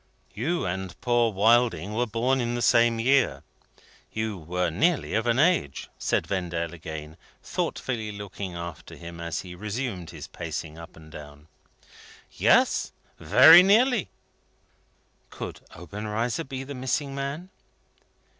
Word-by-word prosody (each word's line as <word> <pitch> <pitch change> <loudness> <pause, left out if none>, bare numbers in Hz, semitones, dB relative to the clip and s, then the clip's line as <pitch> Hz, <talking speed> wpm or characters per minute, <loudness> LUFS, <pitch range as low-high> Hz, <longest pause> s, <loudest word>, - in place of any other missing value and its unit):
"You 165 +10 -1
and 95 0 -4
poor 120 -2 +2
Wilding 110 -2 +2
were 120 +2 0
born 125 +4 0
in 120 0 -2
the 120 - -2
same 115 -1 +4
year. 135 +2 +2 0.7
You 110 -1 -3
were 90 +1 -2
nearly 155 - +1
of 110 +2 0
an 120 0 +2
age," 155 - +1
said - - 0
Vendale, 85 -3 -3
again 80 -1 -8 0.3
thoughtfully 110 -5 -3
looking 100 -2 -7
after 85 -2 -8
him 85 0 -10
as 85 -1 -3
he 90 -1 -10
resumed 105 -1 -4
his - - -9
pacing 80 0 -6
up 85 - -12
and 80 -1 -15
down. 75 0 -12 0.8
"Yes. - - +3 0.3
Very 130 - +9
nearly." 220 +3 +3 1.2
Could - - -8
Obenreizer 105 - -3
be 135 0 -6
the 140 +1 -7
missing 135 +2 -2
man? 140 +7 -5
110 Hz, 130 wpm, -26 LUFS, 85-130 Hz, 1.2 s, Very